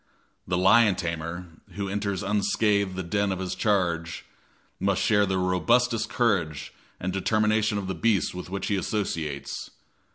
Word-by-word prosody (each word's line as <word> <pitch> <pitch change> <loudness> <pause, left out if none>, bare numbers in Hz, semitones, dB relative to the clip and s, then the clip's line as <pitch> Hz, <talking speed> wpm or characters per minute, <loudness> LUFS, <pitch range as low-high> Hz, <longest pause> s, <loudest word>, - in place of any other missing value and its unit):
The 90 - 0
lion 100 +2 +5
tamer, 85 0 -4 0.3
who 100 -1 -3
enters 100 0 -2
unscathed 100 -1 +1
the 95 - -3
den 100 +3 0
of 95 - -2
his 95 0 -3
charge, 85 -5 0 0.5
must 100 -1 +1
share 105 -2 +3
the 95 0 0
robustious 115 +6 +2
courage 85 - 0 0.3
and 90 +1 -3
determination 110 +1 +1
of 100 - -3
the 95 - -2
beast 100 +3 +1
with 90 0 -7
which 100 +1 -3
he 100 -1 0
associates. 80 -9 -3
95 Hz, 150 wpm, -26 LUFS, 90-105 Hz, 0.5 s, lion